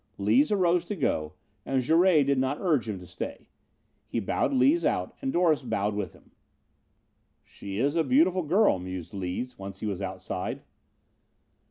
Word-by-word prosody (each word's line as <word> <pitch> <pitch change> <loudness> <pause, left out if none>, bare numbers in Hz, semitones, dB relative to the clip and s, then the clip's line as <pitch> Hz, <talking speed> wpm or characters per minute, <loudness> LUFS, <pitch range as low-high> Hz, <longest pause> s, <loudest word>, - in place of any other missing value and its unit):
Lees 110 - +3
arose 180 -4 +3
to 205 - -4
go 80 - -1 0.3
and 130 +1 0
Jouret 165 +2 +4
did 140 -1 +2
not 130 +2 0
urge 150 - +1
him 105 - -3
to - - -10
stay. - - -7 0.6
He - - -2
bowed 105 - 0
Lees 280 +5 +3
out - - -1
and 270 -1 -1
Doris 170 - +3
bowed 105 -5 -1
with 100 -4 -4
him. - - -21 1.1
"She 100 -1 -8
is 140 +7 +1
a 165 - +3
beautiful 190 - +3
girl," 175 - +3
mused 90 -2 -7
Lees 95 +6 -4
once 95 0 -8
he - - -5
was 100 -3 -3
outside. 95 -1 -4
130 Hz, 165 wpm, -27 LUFS, -, 1.1 s, Jouret